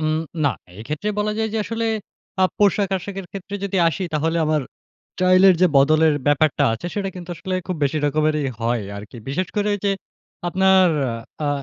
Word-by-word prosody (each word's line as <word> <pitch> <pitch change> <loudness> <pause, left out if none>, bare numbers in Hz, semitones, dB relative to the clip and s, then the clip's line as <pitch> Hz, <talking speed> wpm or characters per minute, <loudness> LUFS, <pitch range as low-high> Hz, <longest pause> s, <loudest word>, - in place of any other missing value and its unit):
উম 155 0 0 0.3
না, 140 - +4 0.3
এক্ষেত্রে 150 - -4
বলা 210 0 0
যায় 220 0 0
যে, 220 - -1
আসলে 230 +1 -2 0.6
আ - - +7
পোশাক-আশাকের 195 -1 0
ক্ষেত্রে 195 +1 -7
যদি 195 -1 -2
আসি, 190 - -3
তাহলে 160 +2 0
আমার 155 -1 +1 0.5
স্টাইলের 185 +1 +5
যে 185 - +7
বদলের 155 +3 +5
ব্যাপারটা 145 0 +3
আছে, 115 +10 -5
সেটা 200 -2 -2
কিন্তু 180 -1 -8
আসলে 185 +2 -4
খুব 185 -2 -3
বেশি 150 +3 0
রকমেরই 150 0 +1
হয় 115 0 0
আরকি। 105 +4 -10
বিশেষ 175 +7 -1
করে 205 0 +1
ওইযে, 200 0 0 0.6
আপনার 190 +1 +4 0.6
আ - - +1
180 Hz, 165 wpm, -21 LUFS, 150-195 Hz, 0.6 s, আ